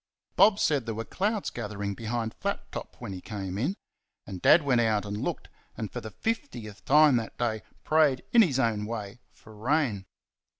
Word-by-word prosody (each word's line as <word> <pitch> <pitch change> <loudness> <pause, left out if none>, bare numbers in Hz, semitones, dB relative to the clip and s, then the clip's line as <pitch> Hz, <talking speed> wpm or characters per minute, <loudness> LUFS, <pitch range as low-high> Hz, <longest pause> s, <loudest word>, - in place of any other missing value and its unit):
Bob 205 -1 +6
said 140 - +1
there 115 - -2
were 115 +1 -4
clouds 210 - -1
gathering 100 -3 -4
behind 115 +1 -3
Flat - - -4
Top - - -7
when 95 - -6
he 90 - -7
came 95 -3 -5
in, 155 - 0 0.5
and 95 -2 -7
Dad 160 0 +6
went 125 -4 +3
out 110 -3 +1
and 100 0 -4
looked, 105 - -3 0.3
and 110 -4 -4
for - - -5
the 110 - -7
fiftieth 120 - -4
time 150 -2 +6
that 115 -1 -5
day 110 -3 -1 0.2
prayed 155 -4 +3
in 235 - +7
his 155 - +3
own 115 -5 +1
way 110 0 -6
for 110 - -17
rain. 115 -4 0
115 Hz, 185 wpm, -28 LUFS, 105-150 Hz, 0.5 s, in